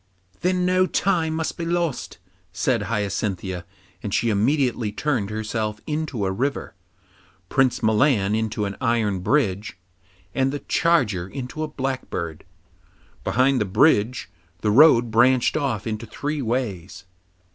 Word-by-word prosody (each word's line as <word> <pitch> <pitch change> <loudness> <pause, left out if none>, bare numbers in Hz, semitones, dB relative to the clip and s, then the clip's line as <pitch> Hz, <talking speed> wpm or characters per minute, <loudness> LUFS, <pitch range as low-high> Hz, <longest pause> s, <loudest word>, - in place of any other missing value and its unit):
'Then 180 0 +1
no 185 +1 +3
time 165 -6 +1
must 160 0 -3
be - - -2
lost,' 170 -4 -2 0.3
said 115 +7 0
Hyacinthia, 100 -4 -2 0.4
and - - -4
she 115 0 +1
immediately 120 0 +1
turned 115 -3 -1
herself 110 0 -3
into 150 -8 -2
a 95 - 0
river, 135 +9 -2 0.8
Prince 130 -2 +2
Milan 110 -2 +3
into 110 -1 -1
an 100 0 -4
iron 115 -6 +1
bridge, 100 -3 0 0.6
and 135 0 +1
the 145 - -4
charger 120 - +1
into 130 +6 -6
a 155 - -1
blackbird. 130 - -4 0.8
Behind 130 0 +2
the - - +1
bridge 120 +2 +2 0.3
the 105 - +1
road 120 -2 +6
branched 120 +2 +4
off 130 -8 -1
into 110 +1 -4
three 145 +7 -3
ways. 100 -8 -3
120 Hz, 130 wpm, -23 LUFS, 105-145 Hz, 0.8 s, road